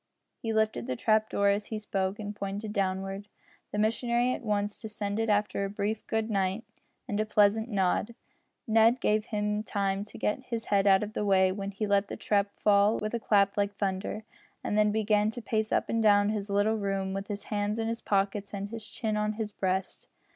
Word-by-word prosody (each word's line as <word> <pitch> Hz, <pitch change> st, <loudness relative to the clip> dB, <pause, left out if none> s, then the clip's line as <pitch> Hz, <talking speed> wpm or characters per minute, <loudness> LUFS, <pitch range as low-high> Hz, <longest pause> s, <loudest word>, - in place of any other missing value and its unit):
He 225 Hz, -, -2 dB
lifted 220 Hz, -, 0 dB
the 125 Hz, -, -1 dB
trap 215 Hz, -, +2 dB
door 200 Hz, 0 st, +2 dB
as 205 Hz, +1 st, 0 dB
he 220 Hz, -, -4 dB
spoke, 195 Hz, -2 st, -2 dB
and 210 Hz, -1 st, -6 dB
pointed 205 Hz, +1 st, -4 dB
downward. 195 Hz, 0 st, -2 dB, 0.4 s
The -, -, -3 dB
missionary 235 Hz, +3 st, +1 dB
at -, -, -5 dB
once 205 Hz, -2 st, -2 dB
descended 215 Hz, 0 st, -2 dB
after 205 Hz, -1 st, +1 dB
a 195 Hz, -, -2 dB
brief 210 Hz, +2 st, -3 dB
"good 220 Hz, 0 st, 0 dB
night," 195 Hz, 0 st, 0 dB, 0.4 s
and 205 Hz, -, -2 dB
a -, -, +3 dB
pleasant 215 Hz, +2 st, +3 dB
nod. 200 Hz, +2 st, 0 dB, 0.5 s
Ned 225 Hz, +1 st, +5 dB
just -, -, -26 dB
gave 215 Hz, 0 st, +2 dB
him 210 Hz, -2 st, -1 dB
time 200 Hz, -2 st, -1 dB
to -, -, -12 dB
get 210 Hz, -, 0 dB
his 230 Hz, -2 st, -4 dB
head 200 Hz, -1 st, +2 dB
out 195 Hz, +1 st, +5 dB
of 210 Hz, 0 st, -6 dB
the -, -, -2 dB
way 190 Hz, -2 st, +4 dB
when 195 Hz, +1 st, -4 dB
he 200 Hz, +2 st, -3 dB
let 200 Hz, 0 st, +2 dB
the -, -, -6 dB
trap 205 Hz, -1 st, +1 dB
fall 205 Hz, +1 st, +4 dB
with 215 Hz, +1 st, -3 dB
a 235 Hz, -, 0 dB
clap 200 Hz, -3 st, +2 dB
like 200 Hz, 0 st, 0 dB
thunder, 200 Hz, +2 st, -2 dB, 0.4 s
and -, -, -1 dB
then 210 Hz, 0 st, +4 dB
began 210 Hz, 0 st, +2 dB
to 225 Hz, -, -6 dB
pace 220 Hz, -2 st, -1 dB
up -, -, +1 dB
and 230 Hz, -, 0 dB
down 205 Hz, -1 st, +5 dB
his 210 Hz, -1 st, -3 dB
little 205 Hz, +2 st, +2 dB
room 195 Hz, -2 st, -2 dB
with 195 Hz, +1 st, -4 dB
his 205 Hz, -1 st, -5 dB
hands 205 Hz, +1 st, 0 dB
in 225 Hz, 0 st, -1 dB
his 230 Hz, 0 st, -3 dB
pockets 200 Hz, 0 st, -1 dB
and 200 Hz, +1 st, -4 dB
his 225 Hz, -1 st, -7 dB
chin 220 Hz, -3 st, -2 dB
on 210 Hz, 0 st, 0 dB
his 215 Hz, -1 st, -4 dB
breast. 190 Hz, -1 st, -2 dB
210 Hz, 210 wpm, -29 LUFS, 200-215 Hz, 0.5 s, Ned